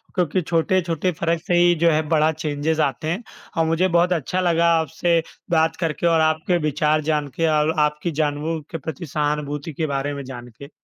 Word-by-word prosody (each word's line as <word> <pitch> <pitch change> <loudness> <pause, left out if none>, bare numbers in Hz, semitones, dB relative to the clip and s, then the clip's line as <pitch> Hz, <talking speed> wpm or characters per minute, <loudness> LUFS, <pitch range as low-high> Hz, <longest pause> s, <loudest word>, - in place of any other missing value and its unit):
क्योंकि 180 0 +1
छोटे-छोटे 170 +1 0
फ़र्क 165 -1 0
से 175 - +1
ही 175 0 +5
जो - - +7
है 155 +1 +2
बड़ा 155 -1 +3
चेंजेज़ 155 0 -1
आते 140 +2 -1
हैं। 185 +9 -2 0.3
और 165 - +3
मुझे 165 +3 +2
बहुत 175 +1 +3
अच्छा 175 +3 -2
लगा 170 -1 +2
आपसे 165 +2 +1 0.3
बात 160 0 +2
करके 165 0 -1
और 165 -1 +3
आपके 160 +3 +1
विचार 150 +1 +1
जान 150 -1 0
के 165 -1 +1
और 150 +1 +2
आपकी 150 +3 0
जानवरों 150 +2 -1
के 165 - -3
प्रति 160 +2 -6
सहानुभूति 150 0 -2
के 155 +2 -2
बारे 145 +1 -2
में 140 -1 -6
जान 125 -2 -9
के। 140 - -9
160 Hz, 195 wpm, -22 LUFS, 150-170 Hz, 0.3 s, जो